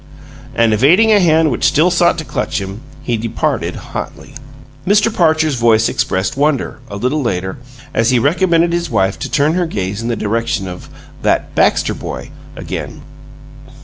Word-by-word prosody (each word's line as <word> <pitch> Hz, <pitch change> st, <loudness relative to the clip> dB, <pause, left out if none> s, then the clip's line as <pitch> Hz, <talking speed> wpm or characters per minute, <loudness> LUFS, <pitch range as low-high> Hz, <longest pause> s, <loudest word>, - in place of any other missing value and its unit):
And 115 Hz, -1 st, +3 dB
evading 170 Hz, -, +4 dB
a 210 Hz, -, +6 dB
hand 160 Hz, -3 st, +3 dB
which 120 Hz, -, -3 dB
still 165 Hz, +5 st, +3 dB
sought 175 Hz, -1 st, +3 dB
to 160 Hz, -, -5 dB
clutch 130 Hz, -5 st, -2 dB
him, 100 Hz, +3 st, -7 dB, 0.2 s
he 120 Hz, -4 st, -1 dB
departed 115 Hz, 0 st, -2 dB
hotly.... 140 Hz, -, -7 dB, 0.5 s
Mr. 210 Hz, +3 st, +3 dB
Parcher's 160 Hz, -4 st, +2 dB
voice 115 Hz, -2 st, +3 dB
expressed 95 Hz, +1 st, -1 dB
wonder, 145 Hz, -1 st, 0 dB
a 100 Hz, -, -6 dB
little 130 Hz, +8 st, 0 dB
later, 95 Hz, -5 st, -3 dB, 0.3 s
as 115 Hz, 0 st, +2 dB
he 125 Hz, -, +3 dB
recommended 170 Hz, +5 st, +2 dB
his 170 Hz, 0 st, -1 dB
wife 95 Hz, 0 st, 0 dB
to -, -, -4 dB
turn 150 Hz, +2 st, +2 dB
her 175 Hz, -1 st, 0 dB
gaze 100 Hz, -, -3 dB
in 115 Hz, -, -4 dB
the 120 Hz, -, 0 dB
direction 110 Hz, -2 st, -2 dB
of 90 Hz, 0 st, -9 dB, 0.3 s
"that -, -, 0 dB
Baxter -, -, +2 dB
boy" -, -, -7 dB, 0.2 s
again. -, -, -6 dB
135 Hz, 165 wpm, -16 LUFS, 110-165 Hz, 0.5 s, a